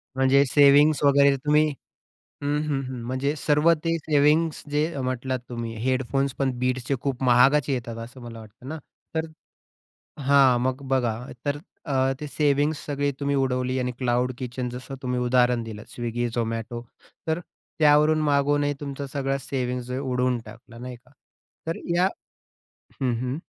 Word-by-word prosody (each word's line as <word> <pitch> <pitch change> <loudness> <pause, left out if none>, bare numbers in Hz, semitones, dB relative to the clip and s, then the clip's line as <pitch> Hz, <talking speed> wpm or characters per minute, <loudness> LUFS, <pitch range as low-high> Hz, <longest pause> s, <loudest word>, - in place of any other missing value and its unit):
म्हणजे 135 +1 +4
सेव्हिंग्ज 145 +2 +5
वगैरे 140 0 +5
तुम्ही 150 +3 +3 0.8
हं, 145 +1 +1
हं, 140 -2 0
हं. 125 -2 -6
म्हणजे 135 +4 -1
सर्व 150 +3 +3
ते 165 0 +1
सेव्हिंग्ज 155 +1 +2
जे 150 +1 +2
अ, 140 - -3
म्हटलात 130 0 -2
तुम्ही. 115 -2 -5
हेडफोन्स 130 +1 0
पण 135 -1 +2
बीट्सचे 130 +1 0
खूप 135 -2 -2
महागाचे 130 +3 +4
येतात 115 -2 -4
असं 125 +2 -12
मला 115 -1 -9
वाटतं 110 +4 -14
ना. 160 - -4 0.4
तर 160 0 0 1.0
हां, 135 -3 +6
मग 130 +2 -1
बघा 125 -4 +1 0.3
तर 145 0 0 0.3
अ, 135 -1 +2
ते 150 - -5
सेव्हिंग्ज 145 +1 +1
सगळा 145 -1 -1
तुम्ही 140 0 0
उडवली. 130 -1 0
आणि 125 0 -1
क्लाउड 125 0 +1
किचन, 125 -1 -4
जसं 125 +3 -7
तुम्ही 125 -1 -1
उदाहरण 125 -1 +2
दिलं 110 -2 -8
स्विगी, 120 0 -3
झोमॅटो. 115 0 -3 0.5
तर 160 +1 0 0.4
त्यावरून 150 +1 +5
मागूनही 145 0 +2
तुमचा 140 -1 -5
सगळी 135 0 -1
सेव्हिंग्ज 125 -2 -3
आहे 130 - -2
उडवून 125 -2 0
टाकला, 115 +2 -13
नाही 125 +1 -7
का? 125 +2 -23 0.6
तर 165 - -2 0.2
या 180 +2 +4 1.0
हं, 125 -2 +2
हं. 130 +3 -2
130 Hz, 155 wpm, -25 LUFS, 125-145 Hz, 1.0 s, हां